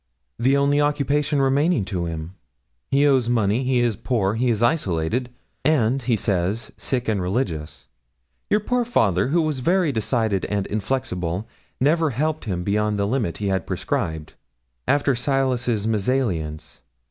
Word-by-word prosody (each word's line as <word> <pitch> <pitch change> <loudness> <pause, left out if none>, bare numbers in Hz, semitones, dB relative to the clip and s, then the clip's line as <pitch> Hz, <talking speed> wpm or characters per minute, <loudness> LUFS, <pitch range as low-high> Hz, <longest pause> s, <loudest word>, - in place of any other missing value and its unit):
'The 135 +4 +3
only 140 +1 +3
occupation 145 0 +1
remaining 135 - +2
to 90 -3 -3
him. 80 +1 -5 0.6
He 140 +1 +3
owes 130 -4 +3
money; 115 +1 +1
he 125 -1 +2
is 120 -3 +1
poor; 100 -3 0
he 120 +3 +1
is 115 -1 +1
isolated; 120 - 0 0.3
and 135 -4 +2
he 120 -2 +1
says, 100 +1 -1
sick 125 -2 -2
and 105 -3 0
religious. 90 - -3 0.6
Your 210 - +3
poor 245 +3 0
father, 100 - +2
who 165 +4 +2
was 155 -4 -1
very 175 +3 +2
decided 110 -4 0
and 100 -1 -1
inflexible, 105 -4 -2 0.3
never 155 +4 +3
helped 155 +4 -2
him 90 -5 -2
beyond 105 +2 0
the 100 - +1
limit 110 -5 -1
he 100 -1 -2
had 95 -1 -1
prescribed, 80 -1 -3 0.5
after 140 -1 +3
Silas's 125 -4 0
mésalliance. 100 - -1
120 Hz, 145 wpm, -23 LUFS, 100-140 Hz, 0.6 s, The